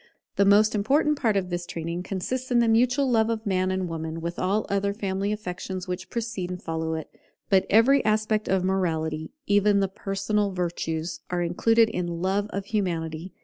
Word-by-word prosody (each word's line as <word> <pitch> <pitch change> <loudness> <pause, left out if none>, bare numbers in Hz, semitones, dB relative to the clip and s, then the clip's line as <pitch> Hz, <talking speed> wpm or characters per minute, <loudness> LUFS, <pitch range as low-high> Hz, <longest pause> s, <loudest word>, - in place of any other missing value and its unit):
The 200 - +3
most 210 +2 +5
important 280 +9 +2
part 220 -5 +2
of 185 -2 -2
this 175 0 -3
training 170 +1 -4
consists 225 +8 -3
in 245 - +3
the 235 -1 +4
mutual 245 +5 +3
love 225 -3 +3
of 225 0 -2
Man 185 -2 +1
and 185 -1 -1
Woman, 160 -1 -4
with 170 +1 -4
all 200 +4 +1
other 200 0 0
family 195 -1 -2
affections 185 -2 -5
which 180 +1 -5
precede 230 -6 -3
and 180 0 -5
follow 160 -1 -3
it. 160 - -5 0.4
But 190 -1 +4
every 245 +7 +5
aspect 215 0 +1
of 190 -1 +2
morality, 160 -4 -1 0.2
even 205 0 +3
the 195 - +2
personal 195 +1 -1
virtues, 170 -2 -3
are 175 -1 0
included 225 +7 +3
in 175 -5 -3
love 195 +3 0
of 200 -1 -4
Humanity. 175 -4 -2
195 Hz, 185 wpm, -26 LUFS, 175-215 Hz, 0.4 s, most